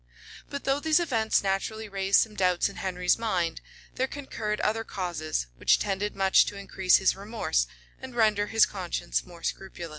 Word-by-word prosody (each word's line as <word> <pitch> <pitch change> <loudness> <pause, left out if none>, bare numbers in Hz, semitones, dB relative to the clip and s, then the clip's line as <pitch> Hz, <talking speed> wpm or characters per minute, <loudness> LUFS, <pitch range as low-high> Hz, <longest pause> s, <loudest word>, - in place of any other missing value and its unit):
[] - - -16
But 280 - -5
though 275 +1 +1
these 315 +2 +3
events 230 -13 +1
naturally 205 +3 -2
raised 195 -1 +3
some 220 - -2
doubts 180 -3 +2
in 200 - -12
Henry's 180 +1 0
mind, 180 -7 -1 0.3
there 260 - 0
concurred 225 -7 -4
other 225 +1 0
causes, 170 - -3
which - - +4
tended 205 +1 -2
much 195 -1 +5
to 200 - -5
increase 190 -2 +3
his 190 - +2
remorse, 195 - -1 0.3
and 260 -2 -9
render 215 -3 +3
his 220 0 +5
conscience 185 -4 -3
more 170 -2 -13
scrupulous. 175 -3 -5
200 Hz, 175 wpm, -27 LUFS, 185-225 Hz, 0.3 s, much